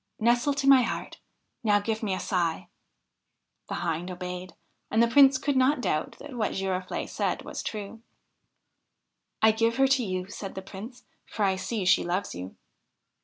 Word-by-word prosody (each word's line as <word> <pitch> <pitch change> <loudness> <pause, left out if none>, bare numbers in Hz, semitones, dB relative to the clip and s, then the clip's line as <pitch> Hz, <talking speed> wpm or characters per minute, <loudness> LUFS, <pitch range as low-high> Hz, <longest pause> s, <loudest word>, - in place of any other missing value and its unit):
' - - -52
Nestle 245 +4 +2
to 275 -1 -1
my 270 -2 +8
heart! 235 - -4 0.4
Now 205 -2 +4
give 220 +1 -2
me 200 -4 -1
a - - -4
sigh! 170 -4 -1 0.5
' - - -46
The - - -2
Hind 170 +2 -2
obeyed, 180 0 -6 0.3
and 220 - -2
the - - +4
Prince 270 +2 +6
could 285 +2 -1
not 260 +2 +3
doubt 155 -10 -1
that 290 -2 -10
what 225 -4 -1
Girofl6e 190 -1 -2
said - - -2
was - - -6
true. 215 +1 -6 0.8
' - - -54
I 220 - +8
give 230 +1 +1
her 270 +1 +4
to 265 -2 +3
you,' 185 -3 -3
said 195 -1 -7
the 190 - -6
Prince; 220 +6 -10
' - - -47
for 210 - 0
I 190 -1 +2
see 190 +2 -3
she 180 - +4
loves 180 +3 -2
you.' 90 +2 -7
210 Hz, 190 wpm, -27 LUFS, 185-245 Hz, 0.8 s, my